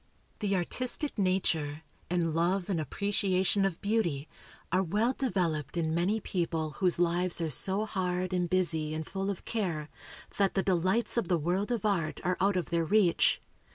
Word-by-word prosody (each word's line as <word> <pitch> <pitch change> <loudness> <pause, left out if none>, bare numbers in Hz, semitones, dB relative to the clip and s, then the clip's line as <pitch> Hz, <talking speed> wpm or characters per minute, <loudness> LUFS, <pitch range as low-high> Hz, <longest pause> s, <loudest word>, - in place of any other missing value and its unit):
The 200 -2 0
artistic 255 - -2
nature, 160 -5 0 0.3
and 170 -2 +1
love 180 +4 +1
and 170 -4 0
appreciation 195 +4 +1
of 185 -4 -1
beauty, 175 -10 0 0.4
are 185 +2 +3
well 210 +8 +1
developed 175 - -1
in 160 -1 0
many 185 +6 +1
people 165 -5 -2
whose 185 -3 +3
lives 175 +1 +1
are 165 -2 -1
so 195 +8 0
hard 185 -2 -2
and 180 -1 0
busy 160 -4 +1
and 160 0 -3
full 195 +3 -3
of 195 - -4
care, 170 -9 -2 0.5
that 200 -1 +2
the 195 - +2
delights 190 +6 +1
of 230 - +1
the 175 - +2
world 180 +8 -1
of 230 -4 -1
art 185 -7 0
are 180 +1 +1
out 200 +1 +3
of 180 -3 -2
their 170 -1 +2
reach. 190 0 +3
185 Hz, 170 wpm, -30 LUFS, 165-200 Hz, 0.5 s, are